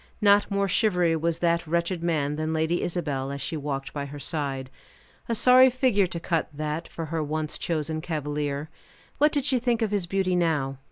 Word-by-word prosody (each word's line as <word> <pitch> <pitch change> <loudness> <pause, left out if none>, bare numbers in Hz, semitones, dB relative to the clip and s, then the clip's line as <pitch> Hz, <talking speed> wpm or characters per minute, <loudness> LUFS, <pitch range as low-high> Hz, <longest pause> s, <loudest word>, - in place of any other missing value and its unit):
Not 205 -1 +4
more 200 0 +1
shivery 180 -4 +2
was 165 +1 0
that 170 -1 +1
wretched 170 +2 0
man 150 -4 0
than 155 +1 -2
Lady 160 +2 0
Isabel, 145 -6 -2
as 140 0 -5
she 140 +4 -3
walked 140 -1 -4
by 140 -1 -4
her 145 +1 -8
side. 135 -3 -3 0.6
A 230 - +1
sorry 255 +3 +7
figure 245 -6 +2
to 170 - -5
cut, 165 -1 -1
that, 150 +2 -4
for 165 - -6
her 165 - 0
once 155 +1 -3
chosen 155 -1 -2
cavalier. 150 -2 -3 0.5
What 300 +1 +5
did 285 -3 0
she 265 -3 +2
think 235 -1 +1
of 215 - -1
his 200 -4 0
beauty 190 0 0
now? 150 -6 0
165 Hz, 190 wpm, -26 LUFS, 150-195 Hz, 0.6 s, sorry